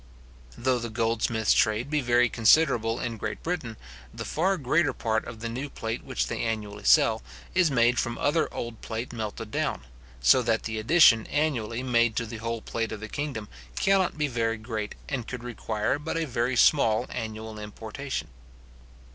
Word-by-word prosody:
Though 130 Hz, 0 st, +1 dB
the 120 Hz, 0 st, -4 dB
goldsmiths 115 Hz, -1 st, +1 dB
trade 115 Hz, +5 st, +1 dB
be 150 Hz, -1 st, +2 dB
very 120 Hz, -1 st, +4 dB
considerable 115 Hz, -2 st, +3 dB
in 115 Hz, -2 st, -3 dB
Great 110 Hz, 0 st, -5 dB
Britain, 155 Hz, -11 st, -3 dB, 0.3 s
the -, -, -7 dB
far 190 Hz, +5 st, +1 dB
greater 145 Hz, 0 st, +2 dB
part 110 Hz, -2 st, -1 dB
of 115 Hz, -1 st, -9 dB
the 115 Hz, -, -3 dB
new 130 Hz, +5 st, -4 dB
plate 115 Hz, -3 st, -4 dB
which -, -, -1 dB
they -, -, -3 dB
annually 105 Hz, -2 st, -3 dB
sell, -, -, +5 dB, 0.3 s
is 180 Hz, -3 st, +4 dB
made 120 Hz, -2 st, +3 dB
from 120 Hz, -1 st, -2 dB
other 150 Hz, +3 st, +1 dB
old 115 Hz, -1 st, -6 dB
plate 115 Hz, +2 st, -5 dB
melted 110 Hz, -1 st, -5 dB
down; -, -, -1 dB, 0.4 s
so 95 Hz, -, +5 dB
that 115 Hz, -2 st, 0 dB
the 110 Hz, -1 st, -3 dB
addition 115 Hz, -2 st, +5 dB
annually 125 Hz, -6 st, -1 dB
made 120 Hz, -3 st, +2 dB
to 115 Hz, -, -1 dB
the 115 Hz, +1 st, -7 dB
whole 115 Hz, 0 st, -4 dB
plate 115 Hz, -1 st, -3 dB
of 110 Hz, -, -5 dB
the 110 Hz, +1 st, -7 dB
kingdom 140 Hz, -8 st, -4 dB, 0.3 s
cannot 195 Hz, -4 st, +2 dB
be 150 Hz, -1 st, +1 dB
very 115 Hz, -3 st, -1 dB
great, 110 Hz, -1 st, -5 dB
and 130 Hz, -6 st, -3 dB
could 125 Hz, -2 st, -6 dB
require 110 Hz, 0 st, -2 dB
but 160 Hz, +2 st, -3 dB
a 165 Hz, -, 0 dB
very 125 Hz, -1 st, -1 dB
small 120 Hz, -4 st, +4 dB
annual 110 Hz, -1 st, -5 dB
importation. 105 Hz, -, -6 dB
115 Hz, 175 wpm, -27 LUFS, 110-130 Hz, 0.4 s, sell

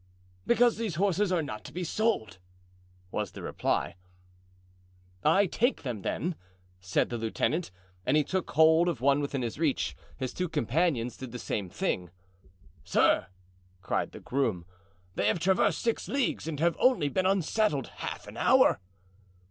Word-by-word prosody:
"Because 240 Hz, -1 st, +4 dB
these 220 Hz, -7 st, -2 dB
horses 195 Hz, +2 st, +1 dB
are 175 Hz, -3 st, +1 dB
not 110 Hz, -7 st, -6 dB
to -, -, -10 dB
be 180 Hz, -, -4 dB
sold," 190 Hz, -, -1 dB, 0.7 s
was -, -, -3 dB
the -, -, -8 dB
reply. -, -, -1 dB, 1.3 s
"I 200 Hz, +1 st, +5 dB
take 240 Hz, +7 st, 0 dB
them, 120 Hz, -7 st, -4 dB
then," 175 Hz, -, -2 dB, 0.5 s
said 90 Hz, 0 st, 0 dB
the 120 Hz, -, -2 dB
lieutenant. 145 Hz, +9 st, -1 dB, 0.3 s
And 150 Hz, -, +2 dB
he 150 Hz, -, +4 dB
took 185 Hz, +4 st, -2 dB
hold 160 Hz, +2 st, +5 dB
of 160 Hz, -9 st, -3 dB
one 140 Hz, +3 st, +3 dB
within 140 Hz, -2 st, -2 dB
his 120 Hz, +4 st, -4 dB
reach; 155 Hz, -4 st, 0 dB, 0.2 s
his 130 Hz, -2 st, -4 dB
two 180 Hz, -1 st, -2 dB
companions 145 Hz, -3 st, 0 dB
did 130 Hz, -2 st, -8 dB
the 125 Hz, -, -5 dB
same 105 Hz, -5 st, -3 dB
thing. 90 Hz, 0 st, -2 dB, 0.7 s
"Sir," -, -, +3 dB, 0.6 s
cried -, -, -1 dB
the -, -, -10 dB
groom, 115 Hz, -10 st, -1 dB, 0.5 s
"they 100 Hz, -, 0 dB
have 110 Hz, -, +2 dB
traversed 185 Hz, +3 st, +2 dB
six 230 Hz, -1 st, -1 dB
leagues 270 Hz, -, -1 dB
and 155 Hz, -3 st, -4 dB
have 170 Hz, +1 st, +2 dB
only 230 Hz, -, +4 dB
been 185 Hz, +6 st, +1 dB
unsaddled 195 Hz, -, +1 dB
half -, -, -5 dB
an -, -, -10 dB
hour." -, -, +5 dB
155 Hz, 155 wpm, -29 LUFS, 125-185 Hz, 1.3 s, I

